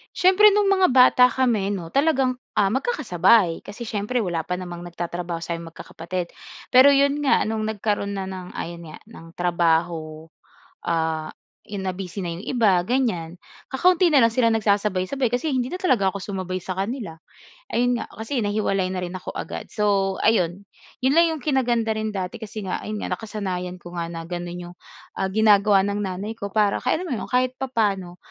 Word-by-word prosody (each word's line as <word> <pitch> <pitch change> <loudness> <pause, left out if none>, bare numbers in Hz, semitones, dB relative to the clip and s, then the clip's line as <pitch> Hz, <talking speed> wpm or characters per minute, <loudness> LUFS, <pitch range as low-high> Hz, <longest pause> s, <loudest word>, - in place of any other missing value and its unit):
Siyempre 385 +3 +6
nung 410 0 +2
mga 380 -5 +4
bata 250 0 +7
kami 225 -7 +1
no, 180 -5 -4
talagang 270 - +2 0.2
ah 200 -2 +2
magkakasabay 215 - +2
kasi 220 +3 -8
siyempre 215 +4 -1
wala 175 -7 -1
pa 180 0 -3
namang 175 -1 -7
nagtatrabaho 175 0 -5
sa'ming 165 0 -5
magkakapatid. 170 +2 -6 0.3
Pero 260 +3 +7
'yon 280 +1 +2
nga 270 - +3
no'ng 220 0 -2
nagkaroon 210 -1 -2
na 195 -1 -4
ng 185 -1 -7
ayon 170 0 -6
nga - - -11
ng 165 -7 -13
trabaho, 165 -2 0 0.5
ah 160 -1 -1 0.4
'yon 205 -1 -6
na-busy 185 +1 -4
na 175 - -3
'yong 190 - -9
iba 210 -8 +3
ganyan, 180 -9 -1 0.3
kakaunti 355 +4 +3
na 280 - +6
lang 230 - +6
sila 230 -2 +3
nagsasabay-sabay 210 +3 0
kasi 250 +6 0
hindi 255 -2 -1
na 365 - -4
talaga 210 - +2
ako 200 - -6
sumabay 185 -1 -4
sa 185 +1 -5
kanila. 200 -4 -4 0.5
Ayun 245 0 +1
nga - - -6
kasi 225 +4 -2
nahiwalay 205 -3 0
na 185 -1 -3
rin 175 - -6
ako 185 0 -7
agad - - -6
so 195 -2 +1
ayun. 190 -3 +2 0.4
'Yon 265 - +4
lang 335 +2 +5
'yong 310 -5 -7
kinaganda 240 -6 +1
rin 215 -1 -3
dati 185 +3 -4
kasi 215 -1 -7
nga 185 - -3
ayun 215 0 -5
nga - - -3
nakasanayan 185 -5 -4
ko 175 0 -12
nga 170 -1 -3
na 165 -1 -6
gano'n 175 0 -5
'yong 175 0 -9 0.5
ah, 190 - +1
ginagawa 205 -1 +4
ng 205 0 -2
nanay 195 +2 -4
ko 200 -3 -6
para 205 0 +1
kaya 255 - +1
naman 260 - -3
ano, - - -6
kahit 255 0 +1
papaano 205 -9 -1
200 Hz, 180 wpm, -23 LUFS, 180-245 Hz, 0.5 s, bata